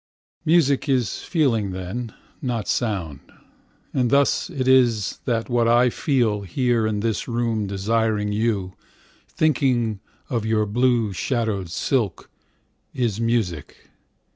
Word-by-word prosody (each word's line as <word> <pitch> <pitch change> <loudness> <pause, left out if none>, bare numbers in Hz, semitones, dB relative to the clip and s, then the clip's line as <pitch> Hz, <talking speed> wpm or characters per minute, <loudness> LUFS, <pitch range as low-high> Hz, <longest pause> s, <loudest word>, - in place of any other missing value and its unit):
Music 150 -5 +3
is 125 -7 +1
feeling 115 - 0
then, 95 +6 -5 0.3
not 120 -5 -2
sound; 95 - -2 0.7
And 125 -2 +1
thus 140 +7 +2
it 135 -7 -3
is 120 -6 +3
that 115 -2 -1
what 120 -2 +2
I 120 +1 +4
feel, 115 -8 +1
Here 115 +4 0
in 105 -1 -1
this 110 -1 -1
room, 115 -3 -1
desiring 105 +1 0
you, 105 -4 -1 0.5
Thinking 125 -8 +1 0.3
of 115 -4 -2
your 110 -1 +1
blue 115 -1 +1
shadowed 110 -4 -2
silk, 110 +1 -1 0.6
Is 115 -4 -1
music. 110 -10 -2
115 Hz, 115 wpm, -23 LUFS, 105-125 Hz, 0.7 s, I